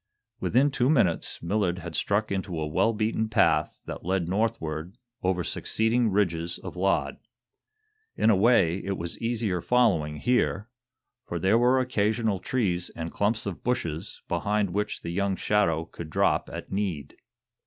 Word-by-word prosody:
Within 135 +5 +3
two 125 0 +1
minutes 105 - +1
Millard 90 0 0
had 85 -1 -7
struck 100 +7 0
into 95 -4 -2
a 80 - -1
well 75 +9 +2
beaten 110 0 -1
path 110 - +2
that - - -7
led 95 -1 0
northward 90 -3 -2 0.2
over 90 -1 0
succeeding 115 +6 0
ridges 85 -4 0
of - - -8
laud. 95 +2 0 1.0
In 110 - +4
a - - +5
way, 95 -4 +4
it 95 0 -2
was 85 0 -4
easier 115 -6 -1
following 95 -12 +2
here, 110 +2 +1 0.6
for 85 - -3
there 95 +6 +3
were 125 +2 +4
occasional 110 -4 0
trees 90 -7 -1
and 80 0 -5
clumps 110 +3 0
of 100 -4 -5
bushes 95 -8 -3
behind 100 +2 0
which 105 +3 -2
the 85 - -4
young 100 +2 0
shadow 85 -6 +1
could 85 -1 -9
drop - - +1
at - - -7
need. 90 -8 -3
100 Hz, 155 wpm, -27 LUFS, 85-110 Hz, 1.0 s, a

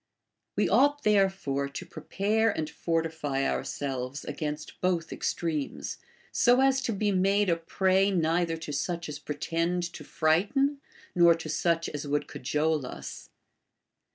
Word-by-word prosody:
We - - +2
ought 290 0 +3
therefore 190 -10 +2
to 140 +6 -7
prepare 210 +5 0
and 160 -7 -2
fortify 160 -4 -1
ourselves 135 -1 -3
against 150 0 -5
both 175 -2 0
extremes, 155 -4 -3 0.3
so 245 +1 +4
as 270 0 +4
to 250 - -1
be 205 0 0
made 195 +1 +3
a - - +4
prey 190 +4 +2
neither 165 -2 +1
to 160 -2 -6
such 170 +4 -2
as 150 -1 -6
pretend 165 +4 -1
to 150 - -8
frighten, 220 - +1 0.3
nor 170 -1 +6
to 160 -1 -7
such 165 +1 +1
as 145 0 -5
would 145 +1 0
cajole 150 +2 0
us. - - -8
165 Hz, 135 wpm, -28 LUFS, 150-195 Hz, 0.3 s, nor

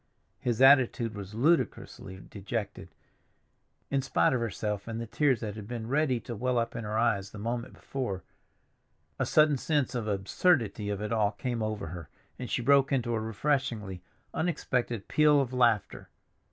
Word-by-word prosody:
His 120 +1 +1
attitude 130 -4 +5
was 100 0 -8
ludicrously 120 - 0
dejected. 100 0 -5 1.0
In 135 -1 +2
spite 135 - +2
of 125 - +1
herself 105 -2 -3
and 115 0 -4
the 115 - -4
tears 130 +1 +1
that 105 -3 -4
had 105 -2 -8
been 120 -1 -5
ready 135 -2 +1
to 120 - -6
well 125 +3 0
up 115 0 -1
in 115 - -4
her 105 +1 -2
eyes 105 -4 +1
the 105 - -11
moment 115 +3 -4
before, 120 -9 -4 1.0
a - - 0
sudden 150 -2 +4
sense 145 0 0
of 120 -3 -2
the 105 - 0
absurdity 105 - +1
of 100 0 -3
it 105 +2 -2
all 105 -2 +2
came 120 +2 -3
over 110 -6 -3
her, 85 -3 -8 0.3
and 125 - -5
she 120 - -1
broke 140 +1 +4
into 120 -3 0
a 115 - 0
refreshingly 110 -4 -2 0.3
unexpected 125 - -1
peal 150 -1 +4
of 130 -2 -1
laughter. 120 -5 +1
115 Hz, 170 wpm, -29 LUFS, 105-130 Hz, 1.0 s, attitude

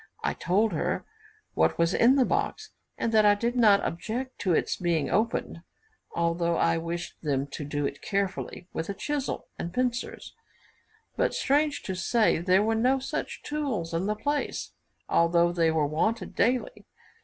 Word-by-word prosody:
I - - +1
told 205 +5 +1
her - - -1 0.5
what - - +2
was 170 +2 +2
in 245 +3 +5
the 265 -3 +4
box, 435 - -2 0.3
and 230 - -1
that 220 -1 +5
I 205 0 +6
did 235 +4 -1
not 215 -5 +5
object 235 +10 -4
to 185 - 0
its 165 - +1
being 170 -4 0
opened, 220 -5 0 0.5
although 170 0 +1
I 165 0 +2
wished 170 +1 -5
them 140 -3 0
to 145 - -5
do 145 0 -2
it - - -4
carefully 195 -2 -3
with 165 +2 -4
a 200 - -3
chisel 290 +2 -3
and 170 - -4
pincers; 245 +3 -2 0.8
but, - - +1
strange 290 +1 +1
to 190 - -3
say, 200 +2 +2
there 185 +3 +3
were 225 +1 +1
no 250 +4 +3
such 265 - -4
tools 260 - -3
in 170 +4 0
the 210 - 0
place, 290 +6 -2 0.4
although 170 +1 +3
they 170 -2 +2
were 160 -2 +2
wanted 190 +10 -1
daily. 250 +1 0
200 Hz, 165 wpm, -27 LUFS, 170-240 Hz, 0.8 s, I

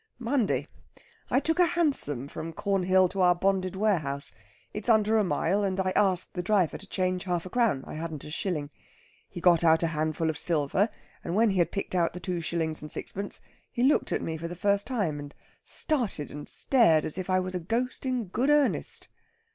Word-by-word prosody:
"Monday. 245 -2 0 0.6
I 260 - +3
took 320 +5 0
a 355 - +6
hansom 145 - +1
from 165 +3 -6
Cornhill 190 0 +2
to 195 - -2
our 180 -1 +5
bonded 190 0 0
warehouse. 160 -9 0 0.4
It's 210 +3 -4
under 220 0 +4
a - - +3
mile, 180 +3 +1
and 195 -1 -1
I 185 0 +1
asked 185 -3 +1
the 180 - -2
driver 185 -3 +2
to 200 - -11
change 185 -1 -1
half 175 -2 -1
a 185 - -8
crown; 230 - +1
I - - -8
hadn't 160 -2 -5
a 150 - -9
shilling. 150 -4 -3 0.6
He - - -7
got 175 -1 +4
out 160 0 +4
a 165 0 0
handful 155 +1 0
of 150 - -8
silver, 170 +6 +1 0.3
and 170 - -3
when 220 0 +4
he 190 - 0
had 170 -1 +2
picked 200 - -4
out 170 -2 +1
the 180 - -6
two 180 -2 -3
shillings 160 -1 -2
and 150 - -8
sixpence 200 +1 -5 0.3
he 240 - -1
looked 275 +3 +3
at - - -1
me 160 0 -3
for 165 +1 -5
the 175 - -6
first 200 +2 +1
time, 200 - -1
and 145 0 -9 0.3
started 240 - 0
and 145 0 -8
stared 220 - +3
as 155 - -2
if 185 - -5
I 185 0 +3
was 185 0 -3
a 180 - -1
ghost 230 +9 -2
in 255 -3 -1
good 240 +9 -1
earnest." 295 -1 +1
185 Hz, 210 wpm, -28 LUFS, 165-210 Hz, 0.6 s, a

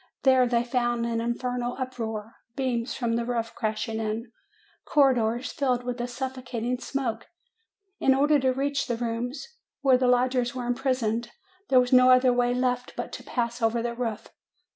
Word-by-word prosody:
There 260 -2 +5
they 235 -1 +2
found 240 -1 0
an 230 -1 -1
infernal 245 +1 -2
uproar, 225 -4 -4 0.2
beams 245 -3 -1
from 230 -2 0
the 235 - -1
roof 230 -1 -2
crashing 220 0 -2
in, 220 +2 -3 0.5
corridors 250 -4 +2
filled 250 -3 0
with 245 0 -3
a 240 - -2
suffocating 250 -1 -4
smoke. 250 -5 -3 0.7
In 265 - +4
order 290 +2 +4
to 260 -1 +2
reach 275 +2 -1
the 235 - -1
rooms 240 - -3 0.3
where 260 -2 +4
the 255 - +2
lodgers 250 0 +2
were 250 -1 -3
imprisoned, 240 -2 -1 0.4
there 260 - +6
was 250 +1 +1
no 255 0 +7
other 255 0 +6
way 245 0 +2
left 250 0 -1
but - - -5
to - - -8
pass 235 -1 -2
over 230 +1 +1
the 240 0 -2
roof. 230 -2 -4
245 Hz, 165 wpm, -26 LUFS, 235-255 Hz, 0.7 s, no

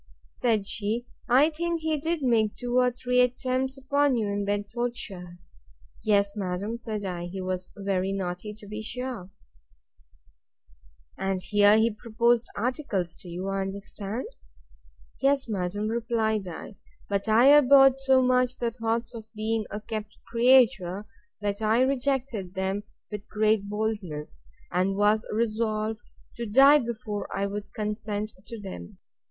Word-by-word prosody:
Said 225 -5 0
she, 215 +4 -2 0.2
I 275 +6 +5
think 335 +1 -2
he 315 0 0
did 320 +1 -2
make 225 -4 +2
two 245 0 0
or 250 0 +4
three 250 0 +1
attempts 255 +2 0
upon 280 0 +2
you 220 -3 0
in 200 0 -1
Bedfordshire? 205 -3 -3 0.7
Yes, 200 -1 +3
madam, 200 +2 -3
said 215 -4 -4
I; 175 -2 -4
he 190 +2 -6
was 185 -1 -3
very 195 -1 -1
naughty, 190 +1 -3
to 215 - -13
be 210 +1 -6
sure. 240 -4 -5 1.9
And 195 -1 0
here 205 +2 +4
he 225 +1 +3
proposed 235 +2 +1
articles 205 - -2
to - - -13
you, 180 +3 -4
I 195 0 -1
understand? 200 +3 -5 1.0
Yes, 275 -1 +2
madam, 205 0 -2
replied 220 -3 0
I; 180 +4 -8 0.3
but 200 +1 -1
I 235 +5 +6
abhorred 270 -1 +7
so 265 -1 +4
much 255 0 +2
the 235 -1 -1
thoughts 230 0 -2
of 220 -1 -10
being 220 0 -1
a 210 - -4
kept 215 -1 -6
creature, 230 -6 +3 0.4
that 205 0 -2
I 220 +3 +3
rejected 260 -7 -1
them 190 +2 -2 0.3
with 210 0 -7
great 215 -1 +1
boldness; 205 - -4 0.3
and 185 +2 +1
was 210 +2 +2
resolved 215 -1 -1 0.4
to 235 -1 -3
die 275 +7 +7
before 230 -4 -4
I 195 - -1
would 200 0 -5
consent 210 0 -3
to 230 - -7
them. 185 - -8
215 Hz, 140 wpm, -27 LUFS, 200-245 Hz, 1.9 s, abhorred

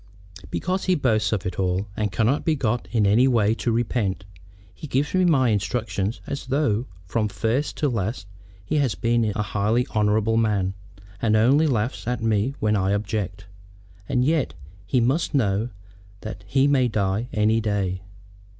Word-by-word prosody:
"Because 185 +1 -2
he 185 - +3
boasts 110 - +1
of 105 -4 -1
it 90 - -4
all, 95 +1 0
and 105 -2 -1
cannot 115 +8 +1
be 160 -2 +1
got 120 -3 -1
in 110 -4 +2
any 110 +6 +4
way 110 -4 +3
to 120 +1 -1
repent. 110 -5 -1 0.5
He 155 - -9
gives 140 +2 0
me 185 0 +3
my 135 -8 +4
instructions 105 -1 -1
as 140 -2 -5
though 130 -4 0 0.2
from 105 +4 0
first 115 +7 -1
to 150 - +1
last 110 -4 -2 0.4
he 150 - 0
had 135 - +1
been 115 0 +2
a 105 - 0
highly 105 +5 0
honorable 110 +1 +2
man, 100 -4 +1 0.5
and 110 -2 +2
only 135 +8 +4
laughs 120 -3 -1
at 125 -1 -2
me 110 +4 +1
when 105 0 +1
I 95 0 +1
object. 100 -2 -3 0.6
And 125 -1 +2
yet 145 - +1 0.3
he 125 - +2
must 135 +6 +1
know 110 -2 +1 0.5
that 110 -2 -8
he 135 +6 +3
may 135 -3 +3
die 105 +1 -1
any 110 +1 +2
day. 100 -4 -1
110 Hz, 170 wpm, -24 LUFS, 105-130 Hz, 0.6 s, any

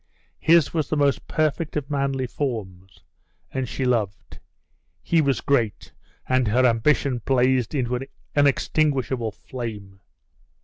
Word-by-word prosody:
His 165 -2 +4
was 155 -4 -1
the 155 - 0
most 140 -2 +1
perfect 155 +1 -1
of 145 0 -4
manly 135 -2 0
forms 95 -9 -5 0.5
and 130 -2 -3
she 130 - -2
loved; 110 -6 -2 0.6
he 165 -1 +3
was 140 -3 +1
great 115 -7 0 0.3
and 130 -2 +2
her 125 +5 +3
ambition 125 +2 +2
blazed 130 -1 +2
into 125 -2 0
an 130 +2 -4 0.3
unextinguishable 135 -3 +1
flame. 105 -5 -8
130 Hz, 125 wpm, -24 LUFS, 115-140 Hz, 0.6 s, His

